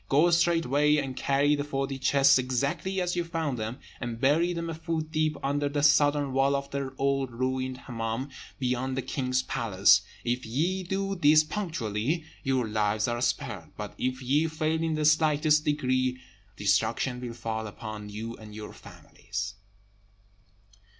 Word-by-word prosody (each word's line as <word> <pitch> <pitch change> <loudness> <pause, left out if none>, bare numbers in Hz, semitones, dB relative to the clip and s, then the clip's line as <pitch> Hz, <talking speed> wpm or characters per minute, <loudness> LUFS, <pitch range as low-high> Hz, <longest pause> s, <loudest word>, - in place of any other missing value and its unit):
Go 155 +5 +4
straightway, 165 -4 +3
and 135 -3 -2
carry 140 +2 +2
the 145 -1 0
forty 135 -1 -3
chests 135 +1 +5
exactly 140 +9 -1
as 180 -1 -1
ye 175 - +1
found 165 -6 -2
them, 110 +3 -4 0.2
and 120 -2 -4
bury 155 +7 +3
them 170 -1 -3
a 165 - -3
foot 160 -1 -3
deep 155 -1 0
under 145 +1 0
the 145 0 -1
southern 145 -1 +4
wall 135 +1 +3
of 140 0 -4
the 140 -1 -3
old 135 -1 +1
ruined 130 +1 -2
Hemmâm, 115 +3 -4 0.3
beyond 130 0 -1
the 135 - -1
king's 130 -2 -1
palace. 105 -7 +4 0.2
If 120 +1 -1
ye 165 +12 -1
do 195 +2 -2
this 155 -3 +5
punctually, 155 - -2 0.2
your 130 -4 0
lives 105 0 0
are 120 0 -2
spared; 100 -9 -2
but 105 -1 -6
if 130 +1 -2
ye 145 +6 +2
fail 155 0 -1
in 165 -1 0
the 155 0 0
slightest 150 0 +4
degree, 130 -4 +1 0.4
destruction 110 +5 +1
will 120 -2 -5
fall 110 -1 -3
upon 105 0 -7
you 110 +3 -6
and 105 -1 -11
your 105 -1 -8
families." 100 +1 -7
135 Hz, 160 wpm, -28 LUFS, 120-155 Hz, 0.4 s, chests